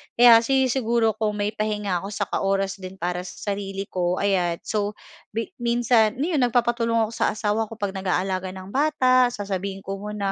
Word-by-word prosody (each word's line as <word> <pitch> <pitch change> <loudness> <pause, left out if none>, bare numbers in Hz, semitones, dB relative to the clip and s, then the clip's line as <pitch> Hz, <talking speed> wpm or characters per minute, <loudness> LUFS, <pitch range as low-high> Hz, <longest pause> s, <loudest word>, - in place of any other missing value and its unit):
Kaya 235 -1 +8
sinisiguro 240 -2 +2
kong 215 -1 0
may 205 0 -1
pahinga 210 -4 -1
ako 195 - -7
saka 205 - -2
oras 195 0 0
din 185 0 -8
para 180 -1 -2
sa 205 - -5
sarili 195 -1 -4
ko. 180 -2 -1
Ayan. 185 -4 +1
So, 210 -1 -2 0.4
mi 225 +8 -3
minsan, 235 -2 +2
'no, 270 - -2
'yon 305 - +1
nagpapatulong 235 -2 +2
ako 220 - -3
sa 230 -1 0
asawa 215 +1 0
ko 225 - -9
'pag 205 -3 -3
nag-aalaga 190 0 -1
ng 190 +1 -9
bata, 255 -2 +3
sasabihin 195 -3 -4
ko 195 0 -5
muna, 205 -1 -3
210 Hz, 180 wpm, -24 LUFS, 195-235 Hz, 0.4 s, Kaya